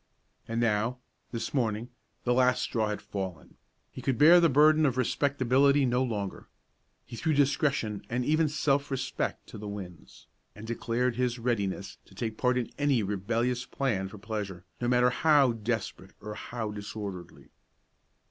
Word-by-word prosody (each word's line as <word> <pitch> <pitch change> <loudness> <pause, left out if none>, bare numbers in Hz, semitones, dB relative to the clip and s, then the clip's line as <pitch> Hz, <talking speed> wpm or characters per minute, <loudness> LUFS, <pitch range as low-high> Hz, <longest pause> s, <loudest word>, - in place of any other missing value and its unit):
And 115 0 -2
now, 115 +1 +1 0.3
this 115 - -4
morning, 115 -2 -1 0.3
the 125 - +2
last 125 0 +3
straw 110 -2 0
had 105 0 -4
fallen; 95 -3 -6 0.3
he - - -8
could 130 -3 0
bear 165 +5 +8
the 170 -1 +4
burden 155 +3 +5
of 130 -4 +2
respectability 140 +1 +3
no 125 0 +1
longer. 105 -6 -3 0.6
He 120 - -9
threw 160 +6 0
discretion 135 -7 +1
and 125 +1 -1
even 155 +1 +2
self 140 -1 +1
respect 130 -1 -3
to - - -9
the 105 - -6
winds, 95 -4 -9 0.3
and 105 - -9
declared 120 +1 -1
his 125 -1 0
readiness 100 -5 -2
to 95 - -19
take 110 +1 -3
part 125 +2 +1
in 125 - -2
any 140 -6 +2
rebellious 115 +5 -1
plan 110 -9 -1
for 95 - -11
pleasure, 100 -3 -5 0.2
no 120 - 0
matter 125 0 +4
how 145 -2 +4
desperate 110 -4 -4
or 105 0 -7
how 110 0 -5
disorderly. 100 -3 -7
120 Hz, 155 wpm, -29 LUFS, 105-135 Hz, 0.6 s, bear